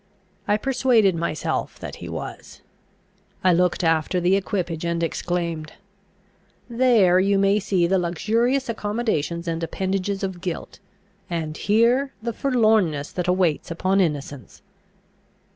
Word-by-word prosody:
I 205 - +3
persuaded 245 -5 +3
myself 165 -2 -2
that - - -8
he - - -8
was. - - -8 0.8
I 185 -1 +5
looked 180 +1 +1
after 165 +2 +1
the 180 +2 +3
equipage, 180 -5 -2
and 170 0 -1
exclaimed, 165 -2 -3 0.9
"There 230 -7 +4
you 195 +1 +2
may 195 +1 +3
see 185 -3 +1
the 190 +2 +2
luxurious 225 - 0
accommodations 205 -7 -2
and 165 0 -2
appendages 195 +3 -2
of 190 -2 -4
guilt, 175 -2 -5 0.5
and 160 -3 -3
here 235 - +2
the 230 +1 -4
forlornness 215 - +1
that 180 -1 -3
awaits 180 -4 +1
upon 185 +4 +1
innocence!" 145 -5 -4
185 Hz, 125 wpm, -23 LUFS, 170-215 Hz, 0.9 s, I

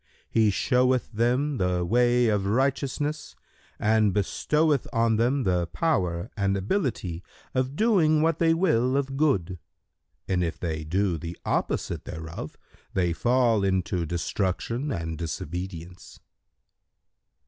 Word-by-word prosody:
He 110 -2 +4
showeth 125 +4 +1
them 125 +6 +1
the 90 -1 0
way 120 +4 +3
of 105 -3 +1
righteousness 140 +5 -1 0.4
and 110 -1 +3
bestoweth 150 - +1
on 115 -1 +2
them 125 +4 +1
the 90 -3 +1
power 90 - -1
and 100 -1 0
ability 100 - -2 0.3
of 130 +1 -1
doing 160 -8 +3
what 165 -1 +1
they 165 -1 +4
will 135 -7 +2
of 135 -1 -2
good: 95 - +1 0.7
and 90 -2 +1
if 85 - -3
they 80 -2 -3
do 90 +1 0
the 85 +2 -7
opposite - - -1
thereof, 80 +1 -7 0.4
they 90 -2 +1
fall 120 0 +2
into 95 -3 0
destruction 100 - -2
and 80 - -4
disobedience." 90 +1 -6
110 Hz, 120 wpm, -26 LUFS, 90-135 Hz, 0.7 s, He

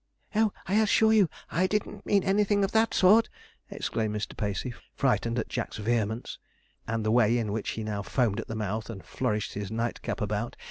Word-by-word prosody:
'Oh, 215 -1 +3
I 205 +4 +3
assure 220 +1 +4
you, 205 -6 +5 0.2
I 185 +4 +2
didn't 210 +2 -3
mean 200 -2 +3
anything 200 +1 +2
of 195 - 0
that 225 0 +3
sort,' 210 +5 +5 0.4
exclaimed 110 -1 -2
Mr. 105 - -4
Pacey, 105 +4 -2 0.2
frightened 125 -3 +1
at 115 - -1
Jack's - - -4
vehemence, 110 +1 -1 0.5
and 115 -1 -2
the 110 - +2
way 120 0 +4
in 110 -3 -1
which 110 +1 -2
he 110 - -4
now 105 -1 -3
foamed 115 0 0
at - - -5
the 115 - -5
mouth, 110 +1 -3
and 95 -5 -8
flourished 105 -1 -2
his 100 -1 -4
nightcap 115 +4 -3
about. 105 +3 -2
115 Hz, 190 wpm, -28 LUFS, -, 0.5 s, you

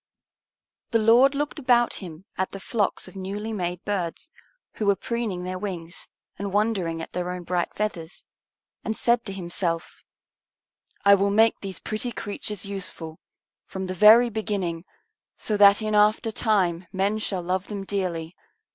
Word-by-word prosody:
The 230 - +3
Lord 240 +5 +5
looked 295 +2 -2
about 245 -3 +3
Him 175 -1 -9
at 190 - -2
the 195 - -6
flocks 205 +1 -1
of - - -13
newly 200 +4 -4
made 180 -3 -3
birds, 200 - -3 0.5
who 215 - -1
were 200 - +5
preening 220 -5 -3
their 185 0 -4
wings 175 -3 -6 0.3
and 200 0 -3
wondering 190 -6 0
at - - -9
their 180 0 -2
own 180 0 -5
bright 175 0 -1
feathers, 180 -6 -4 0.6
and 220 0 -2
said 235 0 +2
to 195 - -4
Himself, 175 -2 -3 1.0
"I 200 - +8
will 200 0 +3
make 220 +3 +4
these 195 -2 -6
pretty 220 +3 -3
creatures 205 -2 -4
useful, 180 -5 -6 0.5
from 190 0 -5
the 185 - -3
very 220 +6 +7
beginning, 195 -6 -2 0.5
so 215 - -1
that 205 +1 +7
in 215 0 -1
after 210 +2 +3
time 185 -6 +1
men 200 +3 0
shall 190 -4 -2
love 185 +2 -1
them 200 -2 -5
dearly. 180 -4 -3
200 Hz, 155 wpm, -25 LUFS, 180-215 Hz, 1.0 s, I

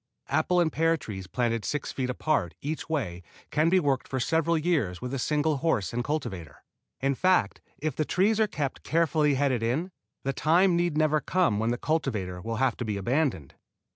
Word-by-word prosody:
Apple 155 +5 +2
and 165 -2 +2
pear 165 +1 +2
trees 95 - -7
planted 115 +1 -1
six 145 +5 -3
feet 130 -2 -2
apart 125 - 0
each 155 +3 -4
way 110 - -2 0.3
can 155 +3 +3
be 185 +2 +4
worked 140 -6 0
for 130 - -2
several 165 +5 +1
years 150 - 0
with 125 +1 -5
a 135 - -2
single 150 +2 +1
horse 130 - 0
and 120 +1 -1
cultivator. 105 - -4 0.4
In 135 +1 +2
fact 180 - +2 0.2
if 155 -3 -3
the 155 - +1
trees 205 +7 +2
are 220 - +4
kept 145 -8 -3
carefully 155 -3 +2
headed 130 -3 +1
in, 140 +11 -1 0.3
the 135 - -1
time 175 +6 +3
need 175 -3 +1
never 155 -1 +3
come 170 - +1
when 110 +1 0
the 120 - 0
cultivator 110 - -2
will 115 +4 -3
have 130 +1 +1
to - - -3
be 105 -2 -2
abandoned. 120 - -1
140 Hz, 195 wpm, -27 LUFS, 115-160 Hz, 0.4 s, be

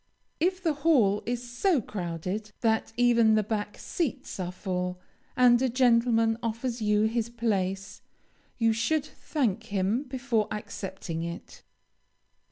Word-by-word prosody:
If 370 +3 0
the 325 -3 +2
hall 225 -11 +4
is 245 0 -2
so 290 +7 +2
crowded 190 +1 -4
that 220 -1 +1
even 235 -2 +5
the 215 - +3
back 210 0 -3
seats 315 - -3
are 180 -1 -2
full, 180 -1 -3 0.4
and 245 -1 +6
a 260 - +2
gentleman 230 -2 +3
offers 230 +1 -3
you 210 0 +3
his 225 +1 0
place, 200 -4 -2 0.6
you 225 -2 +3
should 290 +7 0
thank 230 -11 -2
him 205 +3 0
before 250 -4 -1
accepting 190 -5 -5
it. 170 +1 -7
225 Hz, 130 wpm, -28 LUFS, 200-245 Hz, 0.6 s, and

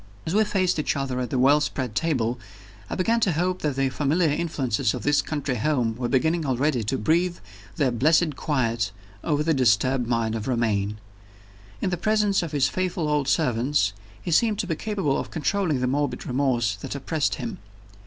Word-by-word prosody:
As 160 - -2
we 215 +2 +4
faced 190 -5 0
each 150 - 0
other 135 -2 -2
at 125 -2 -2
the 130 - -1
well 140 +4 +5
spread 130 -5 -2
table, 125 -7 0 0.5
I - - -3
began 225 +6 +1
to 195 -6 +2
hope 180 +3 0
that 150 -3 -1
the 135 0 +1
familiar 150 +4 +1
influences 135 -8 0
of - - -6
his 145 0 +3
country 145 -3 -3
home 125 -4 0
were 125 +1 -2
beginning 160 +5 +1
already 135 -2 0
to 135 +5 -1
breathe 170 +9 +1 0.4
their 140 -6 +1
blessed 155 +5 +2
quiet 115 -9 -1 0.3
over 150 -1 +1
the 160 +1 +2
disturbed 125 0 +2
mind 115 -2 0
of 110 -1 -4
Romayne. 105 -5 0 0.8
In 185 - 0
the 175 - -1
presence 210 +1 +2
of 165 -3 -4
his 140 -3 +2
faithful 180 -3 -2
old 150 -2 0
servants, 125 -6 +1 0.3
he 175 - -5
seemed 215 +5 +3
to 210 - -1
be 170 -3 -2
capable 195 -7 -1
of - - -5
controlling 160 -2 0
the - - +1
morbid 145 +3 -1
remorse 125 -5 0
that 100 - -6
oppressed 140 +1 -1
him. 220 -7 -6
145 Hz, 190 wpm, -25 LUFS, 125-170 Hz, 0.8 s, well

